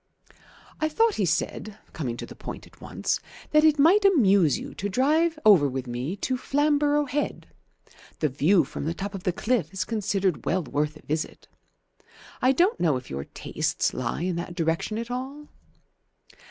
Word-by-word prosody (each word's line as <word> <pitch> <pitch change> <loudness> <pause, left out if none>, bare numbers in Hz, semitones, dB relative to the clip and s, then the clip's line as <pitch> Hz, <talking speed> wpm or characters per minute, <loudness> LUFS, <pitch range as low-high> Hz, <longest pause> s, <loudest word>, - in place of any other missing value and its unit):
"I 310 0 +1
thought," 450 +8 +2
he 195 - 0
said, 200 +6 -2 0.2
coming 125 -7 -4
to - - -6
the - - -11
point - - -8
at - - -21
once, - - -2 0.3
"that 305 0 +5
it 310 -1 +5
might 345 +9 +5
amuse 200 - +4
you - - -8
to 205 - -4
drive 310 - +2
over 180 -10 +6
with 130 0 -4
me 125 +8 -4
to 255 +5 -2
Flamborough 290 +2 +2
Head. 285 +2 -3 0.7
The 155 - +1
view 155 +6 +3
from 140 - -6
the 165 +2 -2
top 200 +2 -5
of 195 -2 -7
the 180 - +2
cliff 215 -3 -1
is 190 - -3
considered 200 -5 -1
well 185 +1 0
worth 150 +1 -2
a - - -19
visit. 155 +1 -4 0.9
I 255 - +5
don't 355 - +2
know 155 -6 +2
if 125 - -10
your 70 +1 -4
tastes - - -2
lie 130 +6 -3
in 180 -1 -1
that 175 +1 -5
direction 165 +6 -1
at 235 +1 -5
all?" 270 +4 -6
200 Hz, 180 wpm, -26 LUFS, -, 0.9 s, over